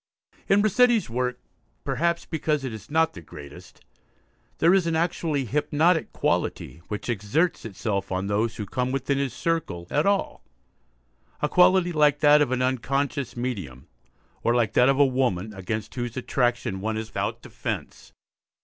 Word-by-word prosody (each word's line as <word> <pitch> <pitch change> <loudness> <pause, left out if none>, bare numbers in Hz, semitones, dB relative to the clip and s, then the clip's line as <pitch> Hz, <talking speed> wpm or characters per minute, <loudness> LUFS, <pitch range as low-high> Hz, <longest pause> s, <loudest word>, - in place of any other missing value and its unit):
In 200 +1 +5
Rossetti's 230 - +3
work, 125 +1 -1 0.4
perhaps 170 0 0
because 150 -2 -1
it 130 -4 -4
is 110 - -10
not 160 +2 +2
the 85 - -10
greatest, 75 -2 -12 0.8
there 170 +3 +4
is 190 -3 +3
an 165 - 0
actually 160 -4 0
hypnotic 150 +6 +1
quality 85 - -2
which 105 - -5
exerts 120 - 0
itself 100 -2 -3
on 95 +1 -1
those 110 +3 0
who 105 - -5
come 125 +5 -2
within 135 +1 -1
his 140 -2 -1
circle 155 - -2
at 150 +5 +2
all; 200 -1 0 1.0
a 150 - +1
quality 180 +2 +4
like 150 -3 +3
that 150 0 +6
of 140 -4 +1
an 130 0 +1
unconscious 135 +1 -1
medium, 95 - -4 0.6
or 115 - +2
like 115 -4 +1
that 125 +2 +5
of 135 - +3
a 145 - +6
woman 120 -7 0
against 105 +3 -5
whose 120 -1 -4
attraction 120 -6 -1
one 110 +1 -2
is 110 0 -5
without - - -3
defence. - - -6
130 Hz, 160 wpm, -25 LUFS, 110-155 Hz, 1.0 s, that